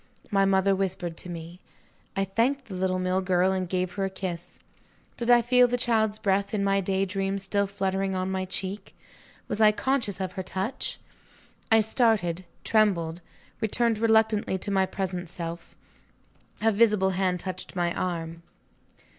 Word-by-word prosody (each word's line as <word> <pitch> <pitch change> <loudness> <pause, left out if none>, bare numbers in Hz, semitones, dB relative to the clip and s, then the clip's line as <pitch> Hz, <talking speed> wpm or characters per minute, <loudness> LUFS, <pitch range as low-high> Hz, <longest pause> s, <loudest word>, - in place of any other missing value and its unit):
My 195 -1 +4
mother 195 0 +3
whispered 185 -3 -2
to 180 - -6
me 170 +1 -8 0.6
I 195 0 +1
thanked 245 +8 0
the 205 - -9
little 185 0 0
mill 185 +1 0
girl, 185 0 +2
and 185 -2 -2
gave 185 -1 -1
her 195 0 -1
a - - -1
kiss. 180 -2 -6 0.6
Did 235 0 -3
I 240 -1 +6
feel 250 +1 +5
the 245 +1 0
child's 220 -3 +1
breath, 200 0 0
in 200 - 0
my 195 0 +2
day 195 +1 0
dream, 195 0 -2
still 200 +1 0
fluttering 195 -1 -1
on 185 0 -1
my 190 0 -1
cheek? 190 +2 -5 0.5
Was 215 - -2
I 215 -1 +7
conscious 240 -3 -1
of 190 -1 -2
her 190 0 -4
touch? 190 +7 -3 0.7
I 225 0 +7
started, 210 -6 +1 0.2
trembled, 180 -6 +2 0.4
returned 225 0 +1
reluctantly 220 -3 +3
to 200 - -4
my 190 -1 +2
present 185 -3 -4
self. 170 -1 -7 0.9
A 225 - +5
visible 210 -3 +3
hand 185 -1 0
touched 185 +1 -6
my 175 -1 0
arm. 165 -2 -3
195 Hz, 165 wpm, -27 LUFS, 185-215 Hz, 0.9 s, I